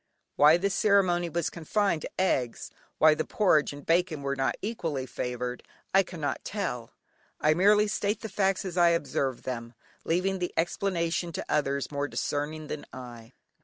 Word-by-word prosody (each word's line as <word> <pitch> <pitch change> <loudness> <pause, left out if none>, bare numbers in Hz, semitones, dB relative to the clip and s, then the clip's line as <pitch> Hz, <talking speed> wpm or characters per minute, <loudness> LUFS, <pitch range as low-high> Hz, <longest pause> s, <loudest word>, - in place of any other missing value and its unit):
Why 150 +3 +7
this 195 +2 0
ceremony 180 -4 +3
was 170 0 -1
confined 175 0 0
to - - -5
eggs, 130 -10 0 0.3
why 155 0 +6
the 155 - -1
porridge 170 -8 +2
and 145 0 -10
bacon 165 -3 +1
were 140 0 -1
not 135 -1 0
equally 165 - -2
favoured 125 0 -4 0.3
I 195 - +7
cannot 170 -6 -4
tell, 145 - -3 0.5
I 155 - +4
merely 205 +5 +5
state 205 0 -1
the 220 - -4
facts 195 -1 0
as 185 -1 -5
I 175 -1 +6
observed 135 -4 -2
them, 120 -2 -5 0.3
leaving 185 +3 0
the 180 - -3
explanation 170 -1 0
to - - -4
others 140 -1 0
more 145 0 -1
discerning 150 +2 -3
than 150 - -6
I. 120 -1 -10
165 Hz, 165 wpm, -28 LUFS, 140-190 Hz, 0.5 s, Why